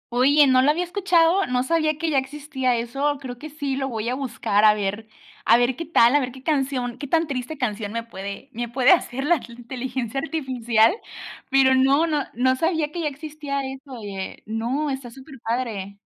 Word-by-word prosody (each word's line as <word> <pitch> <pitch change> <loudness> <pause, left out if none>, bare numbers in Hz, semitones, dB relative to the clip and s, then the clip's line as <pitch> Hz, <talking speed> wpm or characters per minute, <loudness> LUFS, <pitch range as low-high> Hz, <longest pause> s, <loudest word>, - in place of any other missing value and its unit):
Oye, 285 +4 +5
no 255 -1 +5
lo 270 - +3
había 325 +4 +2
escuchado, 360 0 +2
no 250 0 0
sabía 310 0 +1
que 325 0 -1
ya 275 - +4
existía 265 -2 -2
eso, 275 +5 -1
creo 245 -3 -8
que 310 - -8
sí 285 -2 -3
lo 270 0 -2
voy 225 0 -3
a - - 0
buscar, 250 -6 0
a 215 -1 +7
ver, 205 +2 -3 0.4
a 230 - +6
ver 245 +1 +2
qué 335 - -6
tal, 240 -6 +5
a - - +6
ver 255 -2 -3
qué 260 +1 -13
canción, 265 -5 -1
qué 285 - -5
tan 330 +4 +2
triste 275 +1 -4
canción 210 -5 -2
me 230 +1 -3
puede 200 +1 -8
me 240 +1 -4
puede 255 +2 +4
hacer 270 -7 +2
la 330 0 +3
inteligencia 245 +1 -4
artificial, 255 -5 +1 0.6
pero 265 -1 +5
no, 270 +5 +4
no 300 -4 0
no 260 +2 +2
sabía 320 0 0
que 345 - -4
ya 315 - 0
existía 290 -1 -4
eso, 265 +1 -8
oye. 200 -5 -7
No, 240 +7 -2
está 265 -2 -5
superpadre. 230 -6 -5
265 Hz, 195 wpm, -23 LUFS, 240-295 Hz, 0.6 s, a